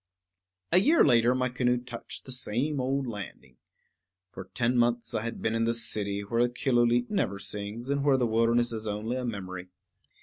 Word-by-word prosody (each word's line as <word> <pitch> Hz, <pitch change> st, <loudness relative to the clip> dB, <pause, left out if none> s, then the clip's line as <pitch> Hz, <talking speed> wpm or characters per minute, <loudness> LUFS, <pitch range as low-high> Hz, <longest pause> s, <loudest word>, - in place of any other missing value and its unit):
A 180 Hz, -, +6 dB
year 305 Hz, -, +5 dB
later 120 Hz, +1 st, +4 dB
my 130 Hz, 0 st, +1 dB
canoe 125 Hz, 0 st, +1 dB
touched 120 Hz, -1 st, -8 dB
the 130 Hz, -, -7 dB
same 130 Hz, +4 st, 0 dB
old 135 Hz, +1 st, -1 dB
landing. 105 Hz, -, -8 dB, 0.7 s
For 95 Hz, -, -8 dB
ten 120 Hz, +1 st, +1 dB
months 120 Hz, -1 st, +1 dB
I 110 Hz, -, -1 dB
had 115 Hz, +1 st, -5 dB
been 110 Hz, -, 0 dB
in 115 Hz, 0 st, +1 dB
the 115 Hz, 0 st, +1 dB
city, 100 Hz, -3 st, 0 dB
where 115 Hz, +4 st, +1 dB
Killooleet 120 Hz, -1 st, +1 dB
never 100 Hz, -, 0 dB
sings, 100 Hz, +4 st, -5 dB
and 140 Hz, 0 st, 0 dB
where 140 Hz, -2 st, +4 dB
the 125 Hz, -, +1 dB
wilderness 115 Hz, +1 st, +2 dB
is 110 Hz, -1 st, -5 dB
only 110 Hz, +4 st, -3 dB
a 130 Hz, -, -3 dB
memory. 95 Hz, -5 st, -5 dB
120 Hz, 180 wpm, -28 LUFS, 110-125 Hz, 0.7 s, A